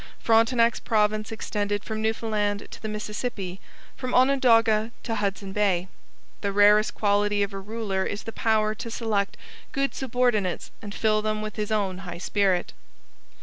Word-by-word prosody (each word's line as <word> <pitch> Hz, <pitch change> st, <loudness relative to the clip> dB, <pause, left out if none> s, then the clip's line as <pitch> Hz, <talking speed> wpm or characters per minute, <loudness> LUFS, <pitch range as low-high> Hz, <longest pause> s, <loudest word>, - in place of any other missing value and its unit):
Frontenac's 230 Hz, +1 st, +3 dB
province 215 Hz, 0 st, +1 dB
extended 205 Hz, -2 st, -2 dB
from 220 Hz, -1 st, -4 dB
Newfoundland 215 Hz, -2 st, -1 dB
to -, -, -10 dB
the 220 Hz, -, -4 dB
Mississippi, 210 Hz, -3 st, -4 dB, 0.3 s
from 255 Hz, -1 st, -3 dB
Onondaga 230 Hz, -4 st, +4 dB
to 230 Hz, -, -3 dB
Hudson 195 Hz, -2 st, -2 dB
Bay. 190 Hz, -3 st, +1 dB, 0.5 s
The 200 Hz, -, -1 dB
rarest 205 Hz, +1 st, +5 dB
quality 205 Hz, 0 st, +2 dB
of 200 Hz, 0 st, -4 dB
a 195 Hz, -, -4 dB
ruler 200 Hz, -1 st, -2 dB
is 205 Hz, -, -4 dB
the 225 Hz, -, -6 dB
power 215 Hz, -1 st, +1 dB
to 230 Hz, -, -7 dB
select 215 Hz, -4 st, -1 dB, 0.3 s
good 275 Hz, -1 st, 0 dB
subordinates 245 Hz, -7 st, 0 dB
and 205 Hz, -1 st, -7 dB
fill 215 Hz, -1 st, +2 dB
them 215 Hz, 0 st, -1 dB
with 215 Hz, -1 st, -5 dB
his 210 Hz, 0 st, -3 dB
own 195 Hz, -4 st, 0 dB
high 175 Hz, -3 st, -7 dB
spirit. 190 Hz, 0 st, 0 dB
215 Hz, 150 wpm, -26 LUFS, 200-225 Hz, 0.5 s, rarest